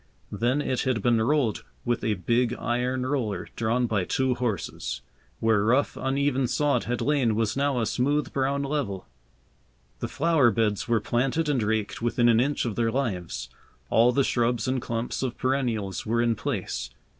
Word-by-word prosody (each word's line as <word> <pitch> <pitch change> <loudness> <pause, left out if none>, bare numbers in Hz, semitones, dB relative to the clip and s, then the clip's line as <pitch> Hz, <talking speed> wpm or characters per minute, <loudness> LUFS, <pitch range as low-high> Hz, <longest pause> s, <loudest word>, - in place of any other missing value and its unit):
Then 120 +8 0
it 130 -2 -1
had 125 -6 0
been 120 -2 +3
rolled 125 -3 +1 0.2
with 120 -1 0
a 110 -1 +1
big 120 +5 +1
iron 125 +2 -1
roller 115 -9 -2
drawn 115 +2 +1
by 105 -5 0
two 130 +7 +1
horses. 105 - -3 0.4
Where 110 -2 +3
rough, 125 +6 +2
uneven 135 -1 0
sod 145 +3 +1
had 120 0 -2
lain 135 -7 +2
was 110 -1 0
now 140 -2 +1
a 115 - +1
smooth 145 +7 0
brown 140 +1 0
level. 135 -10 -2 0.9
The - - -2
flower 160 -5 +3
beds 110 -3 0
were 115 -3 +2
planted 135 +8 0
and 140 -5 +1
raked 110 0 -1
within 120 0 +2
an 115 -1 +5
inch 140 +3 +1
of 115 -4 -2
their 115 -1 +1
lives. 110 -10 -3 0.4
All 120 +2 +5
the 140 +3 +2
shrubs 120 -1 0
and 130 -1 0
clumps 115 +1 -3
of 130 -3 -3
perennials 120 -7 -1
were 115 +2 0
in 120 -1 +2
place. 110 -4 -3
120 Hz, 170 wpm, -26 LUFS, 110-135 Hz, 0.9 s, an